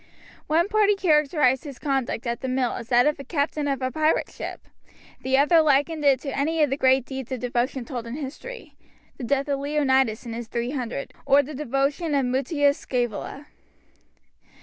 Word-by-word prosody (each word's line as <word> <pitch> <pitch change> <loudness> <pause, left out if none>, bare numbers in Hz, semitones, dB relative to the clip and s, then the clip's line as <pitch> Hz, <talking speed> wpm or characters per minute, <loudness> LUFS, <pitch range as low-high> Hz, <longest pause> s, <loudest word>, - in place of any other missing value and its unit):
One 330 +4 +2
party 415 -1 +3
characterized 300 -7 +2
his 280 -5 -8
conduct 270 -3 -2
at 235 0 -3
the 260 - -3
mill 255 -1 0
as 235 -1 -7
that 245 0 +5
of 300 0 +2
the 275 - -8
captain 290 0 -1
of 275 -2 -1
a 255 - -1
pirate 310 +1 +1
ship, - - -7 0.6
the 260 0 +1
other 320 +4 +5
likened 300 +1 +2
it 275 -3 +4
to 275 - -4
any 310 +3 +1
of 290 - +1
the - - +2
great 260 -2 +3
deeds 265 -2 -7
of 260 - -2
devotion 245 +1 -1
told 240 -2 -6
in 230 - -5
history 310 - -8 0.5
the - - -6
death 275 +4 0
of 280 -1 -1
Leonidas 265 -5 +1
and 230 - -5
his 235 0 -6
three 235 +2 -3
hundred, 260 0 -4
or 280 +1 +4
the 300 +3 -8
devotion 285 +3 -1
of 275 -2 +2
Mutius 285 +3 +1
Scaevola. 245 +3 -3
275 Hz, 190 wpm, -24 LUFS, 255-300 Hz, 0.6 s, that